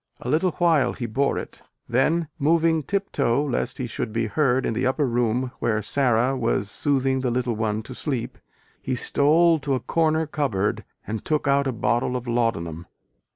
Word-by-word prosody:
A 125 - -5
little 165 +5 +2
while 160 -8 +2
he 120 - -5
bore 135 +5 0
it: - - -7 0.3
then, 155 +7 +1
moving 160 +2 +3
tip 195 +6 -2
toe 140 +1 +1
lest 125 -2 -2
he 130 - -3
should 110 -2 -4
be 115 +1 -1
heard 130 +3 +1
in - - 0
the 125 +3 0
upper 140 +3 +1
room 120 +1 0
where 110 -2 +1
Sara 125 +1 +2
was 115 -5 -1
soothing 135 -2 +1
the 130 - 0
little 120 -1 -1
one 110 0 -1
to 130 - -9
sleep, 130 -2 -4 0.4
he 130 - -2
stole 160 +6 +3
to 140 -1 -1
a - - -1
corner 160 +1 +1
cupboard 130 -10 -1 0.2
and 110 +1 -4
took 150 -2 -1
out 140 0 +3
a - - 0
bottle 120 +1 0
of 125 -1 -4
laudanum. 85 -9 -1
130 Hz, 185 wpm, -24 LUFS, 115-150 Hz, 0.4 s, moving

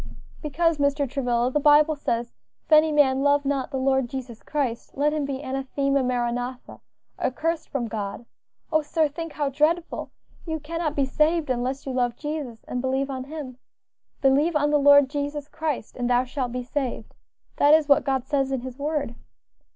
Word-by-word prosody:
"Because, 315 +1 0
Mr. 285 0 +1
Travilla, 245 -2 0
the 295 - +1
Bible 300 +1 +5
says, 235 -4 -2 0.3
'If - - -31
any 310 0 +6
man 270 -3 +3
love 285 0 +3
not 275 -1 -1
the 270 - -3
Lord 265 -1 +1
Jesus 245 -4 -7
Christ, 265 -6 -3
let 295 +2 +2
him 300 -2 -1
be 275 0 -4
anathema, 275 +1 0
maranatha,' 245 0 -3 0.4
accursed 320 +5 -1
from 250 -4 -2
God. 210 0 -5 0.5
Oh! 310 - +4
sir, 310 +1 +1
think 330 +2 -7
how 290 -2 -1
dreadful! 310 +5 0 0.4
You 320 -1 -2
cannot 315 0 -3
be 280 - +2
saved 305 +2 +1
unless 255 +2 -2
you 270 - -3
love 245 -2 0
Jesus, 295 -7 -5
and 250 - -4
believe 265 +1 -1
on 260 -1 -5
Him. 280 -4 -8 0.6
'Believe 285 +5 +3
on 295 0 +2
the 295 - +4
Lord 285 -1 +7
Jesus 290 +1 -4
Christ, 305 -8 -4
and 245 -1 -2
thou 245 0 +3
shalt 255 -1 -3
be 250 0 -3
saved.' 260 0 -4 0.4
That 290 +2 +6
is 315 -2 +2
what 280 - +5
God 265 -2 -1
says 270 -1 0
in 265 -2 -1
his 260 +1 -8
word." 290 -4 -2
275 Hz, 180 wpm, -25 LUFS, 255-300 Hz, 0.6 s, Lord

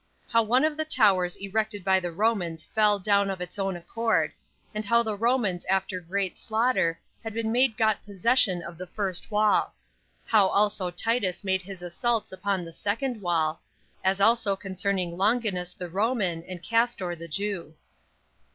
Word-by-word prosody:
How 230 - +4
One 240 +5 +3
Of 310 -1 -1
The 315 - 0
Towers 200 - +3
Erected 205 0 -2
By 190 0 +4
The 175 -2 -4
Romans 175 -4 -1
Fell 210 -1 +3
Down 200 0 +2
Of 190 -1 -4
Its 180 +3 -6
Own 195 -1 -1
Accord; 225 +6 0 0.4
And 215 0 -3
How 235 +3 +3
The 220 -2 -2
Romans 220 -5 +1
After 190 -1 0
Great 185 +2 -3
Slaughter 220 -7 +1 0.2
Had 225 -1 -6
Been 225 -1 -1
Made 245 -1 +2
Got 220 -2 +1
Possession 200 -2 +2
Of 170 -1 -9
The 185 - -6
First 190 -2 -2
Wall. 210 0 +2 0.5
How 210 -4 +4
Also 200 -2 +1
Titus 195 +1 -1
Made 190 -1 +1
His 190 -1 -9
Assaults 225 +6 -1
Upon 190 -1 -2
The 165 - -10
Second 225 +5 -2
Wall; 165 -3 0 0.4
As 190 +1 +1
Also 220 -1 +3
Concerning 190 -2 -2
Longinus 200 -4 +1
The 180 0 -7
Roman, 195 -2 0
And 180 -2 -8
Castor 230 -6 0
The 170 0 -9
Jew. 180 -2 -3
200 Hz, 165 wpm, -26 LUFS, 180-220 Hz, 0.5 s, How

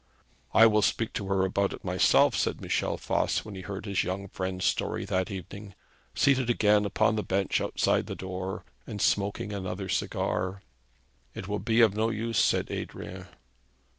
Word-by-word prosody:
'I 115 - +9
will 105 -1 +4
speak 115 +2 0
to 100 - -3
her 95 -1 +2
about 100 +1 0
it - - -10
myself,' 90 -1 +4
said - - 0
Michel - - -1
Voss, - - 0
when 105 - -8
he 95 - -7
heard 100 +1 -6
his 100 -3 0
young 95 +2 -4
friend's 95 -1 -3
story - - 0
that 95 +2 -1
evening, 100 +1 -8 0.4
seated 130 -3 +3
again 105 -3 +3
upon 105 +2 +2
the - - +1
bench 95 0 0
outside - - +1
the - - -5
door, 95 0 -5 0.2
and 105 - -6
smoking 100 +1 0
another 95 0 -4
cigar. 95 +1 -1 0.7
'It 95 - -6
will 105 0 -2
be 115 +1 +2
of 110 -3 +5
no 110 +1 +1
use,' 115 +1 -1
said - - +1
Adrian. - - -6
100 Hz, 170 wpm, -28 LUFS, 95-105 Hz, 0.7 s, I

